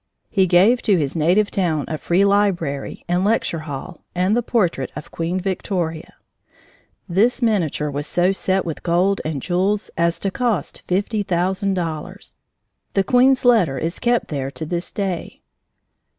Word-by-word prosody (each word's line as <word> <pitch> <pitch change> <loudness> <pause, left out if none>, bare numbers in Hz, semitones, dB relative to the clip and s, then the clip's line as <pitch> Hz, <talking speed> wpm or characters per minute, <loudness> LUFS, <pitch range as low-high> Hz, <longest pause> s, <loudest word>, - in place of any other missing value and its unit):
He 190 -3 +3
gave 195 +8 +5
to 200 -4 +3
his 145 -2 -1
native 180 +6 +2
town 160 -7 0
a 155 - -3
free 185 +3 +2
library 185 -9 0
and 175 +1 +1
lecture 205 -5 +1
hall 135 -2 -7
and 185 +4 +2
the 240 - +2
portrait 180 - 0
of 150 - -8
Queen 170 +3 -2
Victoria. 180 -3 -3 0.9
This 210 +8 +2
miniature 165 -9 0
was 145 +1 -4
so 180 +2 +2
set 190 0 0
with 165 -3 -5
gold 180 +3 +1
and 150 -4 -3
jewels 190 +3 0
as 170 0 +1
to 195 - -1
cost 235 -2 -1
fifty 205 +4 0
thousand 190 +2 0
dollars! 175 +2 -5 0.6
The 195 - +3
queen's 255 +3 +3
letter 210 - +4
is 165 +6 -3
kept 240 -1 +1
there 135 -3 -3
to 160 +3 -6
this 175 +2 -4
day. 190 -4 -4
180 Hz, 155 wpm, -21 LUFS, 165-200 Hz, 0.9 s, gave